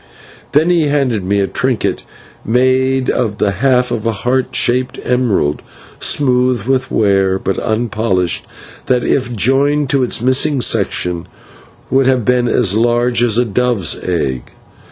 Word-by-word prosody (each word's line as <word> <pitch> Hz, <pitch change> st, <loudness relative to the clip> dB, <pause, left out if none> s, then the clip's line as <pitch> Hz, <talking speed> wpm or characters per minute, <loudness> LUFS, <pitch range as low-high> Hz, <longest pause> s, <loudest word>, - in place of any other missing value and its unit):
Then 155 Hz, +5 st, +3 dB
he 165 Hz, -4 st, +2 dB
handed 135 Hz, -8 st, 0 dB
me 100 Hz, +2 st, 0 dB
a -, -, +1 dB
trinket 95 Hz, -, -1 dB, 0.4 s
made 130 Hz, +2 st, +1 dB
of 110 Hz, -4 st, -1 dB
the 100 Hz, -, +1 dB
half 125 Hz, +4 st, +1 dB
of 115 Hz, -1 st, -2 dB
a -, -, +2 dB
heart 125 Hz, +4 st, -2 dB
shaped 125 Hz, +1 st, +1 dB
emerald, 115 Hz, -, 0 dB, 0.4 s
smooth 125 Hz, -4 st, +1 dB
with 130 Hz, +1 st, -1 dB
wear, 95 Hz, -2 st, +1 dB
but 95 Hz, 0 st, -3 dB
unpolished, 110 Hz, -5 st, -1 dB, 0.4 s
that, 125 Hz, -1 st, +1 dB
if 125 Hz, -3 st, -1 dB
joined 135 Hz, +5 st, +1 dB
to 140 Hz, -, +2 dB
its 125 Hz, -, 0 dB
missing 130 Hz, +4 st, +1 dB
section, 90 Hz, -7 st, -1 dB, 0.6 s
would 135 Hz, 0 st, +3 dB
have 130 Hz, -4 st, +1 dB
been 125 Hz, -1 st, +2 dB
as 105 Hz, -4 st, +2 dB
large 120 Hz, +1 st, +1 dB
as 115 Hz, -2 st, +2 dB
a 125 Hz, -, +2 dB
dove's 115 Hz, -4 st, 0 dB
egg. 70 Hz, -8 st, -2 dB
125 Hz, 145 wpm, -15 LUFS, 105-130 Hz, 0.6 s, Then